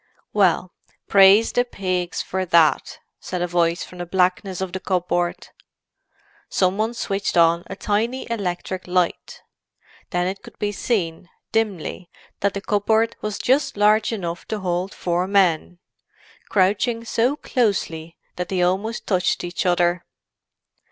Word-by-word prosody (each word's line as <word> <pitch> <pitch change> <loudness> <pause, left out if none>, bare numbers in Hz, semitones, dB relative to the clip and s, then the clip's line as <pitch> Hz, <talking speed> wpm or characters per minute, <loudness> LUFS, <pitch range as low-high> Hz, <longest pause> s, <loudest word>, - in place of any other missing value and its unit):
"Well, 185 -3 +2 0.3
praise 200 +3 +6
the 245 - +2
pigs 185 -6 -3
for 190 0 -2
that," 170 -3 +3 0.2
said 180 -1 -4
a - - 0
voice 170 -1 +1
from 180 - -12
the 175 - -5
blackness 185 +1 0
of 190 -2 -4
the 190 - -3
cupboard. 175 -2 -1 1.0
Some 190 +1 +1
one 225 +2 0
switched 200 -4 -2
on 170 0 +4
a 195 - -6
tiny 220 +6 -1
electric 185 -4 -3
light. 180 -1 -1 0.7
Then 175 0 0
it 190 +2 -3
could - - -14
be 205 0 -1
seen, 180 -6 -2 0.2
dimly, 195 -5 -2 0.3
that 200 0 0
the 200 - -3
cupboard 220 +3 +1
was 210 -1 -3
just 265 -2 +1
large 210 +2 +4
enough 175 -6 -4
to 215 -2 -3
hold 180 +1 -1
four 175 +1 -1
men, 180 -3 +2 0.7
crouching 215 +4 +1
so 240 +4 +1
closely 185 - -1 0.2
that 180 - -3
they 185 -2 +1
almost 195 +6 -1
touched 185 -2 0
each 175 +1 -2
other. 175 0 +2
190 Hz, 140 wpm, -22 LUFS, 175-210 Hz, 1.0 s, praise